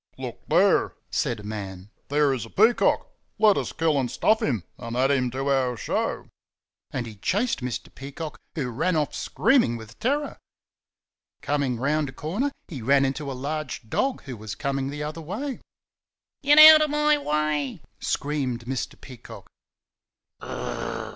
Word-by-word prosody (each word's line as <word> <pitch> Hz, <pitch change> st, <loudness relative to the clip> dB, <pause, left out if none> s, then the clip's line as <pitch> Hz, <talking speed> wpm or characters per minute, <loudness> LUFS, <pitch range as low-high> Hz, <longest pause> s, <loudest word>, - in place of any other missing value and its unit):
"Look -, -, -6 dB
there!" -, -, +3 dB, 0.2 s
said 115 Hz, -3 st, -1 dB
a -, -, -14 dB
man. 100 Hz, -2 st, -7 dB, 0.2 s
"There 145 Hz, -1 st, +2 dB
is 130 Hz, -, -3 dB
a 115 Hz, -, -9 dB
peacock. 220 Hz, -, +3 dB, 0.3 s
Let 210 Hz, -2 st, +5 dB
us -, -, -2 dB
kill 160 Hz, -3 st, +1 dB
and 125 Hz, -2 st, -1 dB
stuff 220 Hz, -, +2 dB
him 115 Hz, -10 st, 0 dB, 0.2 s
and 115 Hz, 0 st, -5 dB
add 135 Hz, +2 st, +3 dB
him 130 Hz, -3 st, +2 dB
to 135 Hz, +3 st, -3 dB
our 130 Hz, -3 st, +1 dB
show." -, -, -2 dB, 0.6 s
And 125 Hz, -2 st, -3 dB
he 115 Hz, -, -8 dB
chased 205 Hz, -, 0 dB
Mr. 125 Hz, -2 st, -5 dB
Peacock, 145 Hz, +3 st, -7 dB, 0.2 s
who 135 Hz, -6 st, -2 dB
ran 165 Hz, +9 st, 0 dB
off 150 Hz, -3 st, 0 dB
screaming 240 Hz, -, +2 dB
with 110 Hz, 0 st, -12 dB
terror. 285 Hz, +4 st, -1 dB, 1.0 s
Coming 140 Hz, -4 st, 0 dB
around 145 Hz, +3 st, 0 dB
a -, -, -10 dB
corner 205 Hz, -, -2 dB, 0.2 s
he 145 Hz, -8 st, -7 dB
ran 135 Hz, +4 st, +4 dB
into 140 Hz, +1 st, -3 dB
a 130 Hz, -, -5 dB
large 140 Hz, -4 st, -4 dB
dog 270 Hz, -2 st, 0 dB
who 130 Hz, -3 st, -7 dB
was 105 Hz, -1 st, -7 dB
coming 135 Hz, -1 st, -2 dB
the 145 Hz, +1 st, -5 dB
other 155 Hz, +2 st, -5 dB
way. 235 Hz, -, -4 dB, 0.8 s
"Get 295 Hz, 0 st, +5 dB
out 310 Hz, 0 st, +11 dB
of 305 Hz, -, +2 dB
my 300 Hz, 0 st, +3 dB
way!" 150 Hz, -, -1 dB, 0.2 s
screamed 135 Hz, -5 st, -2 dB
Mr. 130 Hz, +1 st, -4 dB
Peacock. 125 Hz, -4 st, -11 dB
140 Hz, 160 wpm, -25 LUFS, 125-165 Hz, 1.0 s, out